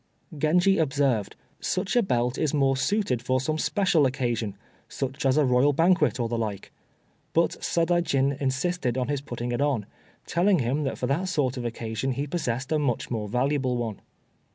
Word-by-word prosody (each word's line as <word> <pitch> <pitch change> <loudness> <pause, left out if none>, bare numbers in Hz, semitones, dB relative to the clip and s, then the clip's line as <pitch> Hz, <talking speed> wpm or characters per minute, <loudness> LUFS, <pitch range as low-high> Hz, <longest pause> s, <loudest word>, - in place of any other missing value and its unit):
Genji 175 +6 +3
observed: 135 -8 +1 0.2
"Such 185 - -1
a 240 - +5
belt 125 - 0
is 155 0 0
more 135 -2 +3
suited 135 - 0
for 130 +1 +1
some 155 +4 -2
special 185 -8 +2
occasion 120 -6 -2 0.3
such 135 +1 -2
as 135 +2 +3
a 150 - +4
Royal 130 +3 +3
banquet, 175 -1 +3
or 120 - 0
the 115 0 -2
like." 105 -3 -4 0.6
But - - +3
Sadaijin 165 -5 +1
insisted 130 -1 -1
on 130 0 -1
his 145 -2 -1
putting 120 -3 -5
it 120 - -1
on, 135 -8 +1 0.4
telling 185 +3 +2
him 140 +3 0
that 135 - -2
for - - -2
that 160 +9 0
sort 145 -7 0
of 125 -2 -5
occasion 115 +2 -3
he 140 +3 -2
possessed 135 -4 -3
a 155 - +2
much 130 -6 -1
more 110 -3 -2
valuable 130 +1 0
one. 115 -4 -4
135 Hz, 175 wpm, -26 LUFS, 120-155 Hz, 0.6 s, a